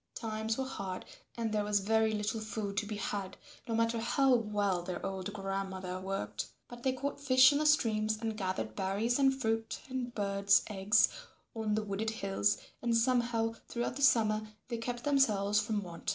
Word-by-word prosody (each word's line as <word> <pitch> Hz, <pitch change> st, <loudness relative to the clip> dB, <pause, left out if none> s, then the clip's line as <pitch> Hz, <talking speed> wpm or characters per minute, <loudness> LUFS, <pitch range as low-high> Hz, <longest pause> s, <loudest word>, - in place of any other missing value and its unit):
Times 220 Hz, 0 st, -2 dB
were 265 Hz, -, -1 dB
hard, 195 Hz, -7 st, -5 dB, 0.3 s
and 225 Hz, -2 st, -1 dB
there 210 Hz, -1 st, +1 dB
was 205 Hz, 0 st, +2 dB
very 220 Hz, +2 st, +2 dB
little 210 Hz, +1 st, -1 dB
food 215 Hz, -2 st, -4 dB
to 205 Hz, -, 0 dB
be 215 Hz, -, -4 dB
had 200 Hz, -2 st, -4 dB, 0.3 s
no 230 Hz, -, -1 dB
matter 230 Hz, 0 st, +1 dB
how 255 Hz, +3 st, +3 dB
well 205 Hz, -5 st, +1 dB
their 180 Hz, 0 st, -5 dB
old 190 Hz, 0 st, -4 dB
grandmother 195 Hz, -2 st, -4 dB
worked; 190 Hz, -, -3 dB, 0.2 s
but 240 Hz, 0 st, -10 dB
they 260 Hz, -, +2 dB
caught 280 Hz, +2 st, -4 dB
fish 260 Hz, -1 st, +7 dB
in 285 Hz, -, +1 dB
the 305 Hz, -, +2 dB
streams 220 Hz, -7 st, +2 dB
and 225 Hz, -1 st, -2 dB
gathered 190 Hz, -3 st, -3 dB
berries 205 Hz, +6 st, 0 dB
and 270 Hz, -1 st, +3 dB
fruit 225 Hz, -2 st, -1 dB
and 245 Hz, -2 st, -3 dB
birds' 200 Hz, -1 st, +3 dB
eggs 200 Hz, +1 st, +4 dB, 0.5 s
on 220 Hz, -2 st, -1 dB
the 215 Hz, -, 0 dB
wooded 210 Hz, +2 st, -2 dB
hills, 200 Hz, -2 st, 0 dB, 0.2 s
and 235 Hz, -1 st, +2 dB
somehow 235 Hz, -2 st, +1 dB
throughout 240 Hz, +1 st, -2 dB
the 280 Hz, -, -5 dB
summer 220 Hz, -5 st, +4 dB, 0.3 s
they 235 Hz, -, -2 dB
kept 240 Hz, +1 st, -4 dB
themselves 210 Hz, -8 st, +3 dB
from 210 Hz, -1 st, -1 dB
want. 170 Hz, -2 st, -6 dB
220 Hz, 180 wpm, -32 LUFS, 200-240 Hz, 0.5 s, fish